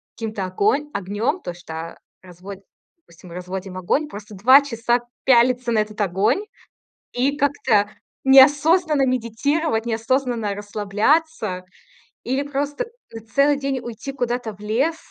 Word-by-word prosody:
каким-то 215 -4 -4
огон 210 +11 0
огнём, 205 - -2
то 175 - -5
что 165 -1 -8 0.2
разво 185 +2 -10 0.5
допустим, 170 +1 -16
разводим 180 +1 -6
огонь, 270 +12 0
просто 210 -5 -10
2 255 +9 +7
часа 240 -2 0 0.3
пялиться 245 -1 +4
на 225 - +2
этот 215 0 -3
огонь 205 - +1 0.7
и 275 +4 0
как-то 225 -8 +1 0.3
неосознанно 290 +3 +5
медитировать, 250 +1 -1
неосознанно 230 -2 -1
расслабляться 210 - -1 0.6
или 265 +3 -1
просто 285 - -3 0.3
на 225 - -7
целый 280 +6 +2
день 275 -2 -2
уйти 240 +4 -7
куда-то 245 -3 -2
в 200 - -21
лес 245 +10 0
235 Hz, 125 wpm, -21 LUFS, 205-275 Hz, 0.7 s, 2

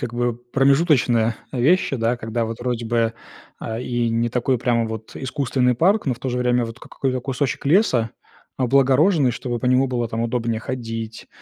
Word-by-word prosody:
как 120 -3 -4
бы, 120 0 +1
э, - - -4 0.2
промежуточные 135 -5 +3 0.2
вещи, 140 +4 +2
да, 115 +1 0
когда 115 0 -2
вот 115 +1 -6
вроде 120 -2 -2
бы, 115 -1 +1 0.5
а, 110 0 -5
и 120 -1 -1
не 115 +1 0
такой 125 +2 +1
прямо 115 -1 +1
вот 110 0 -7
искусственный 130 -2 0
парк, 190 - +2
но 130 - +1
в 115 - -17
то 130 0 -3
же 125 - -1
время, 125 -1 +2
вот, 115 0 -8
как - - -14
какой-то 130 -2 -1
кусочек 135 +1 -2
леса 135 - +3 0.5
облагороженный, 135 +3 +3
чтобы 120 0 -4
по 125 - -3
нему 130 +1 +4
было 120 -2 -2
там 110 +1 -3
удобнее 115 -1 -1
ходить, 115 -3 -6
125 Hz, 190 wpm, -22 LUFS, 115-130 Hz, 0.5 s, нему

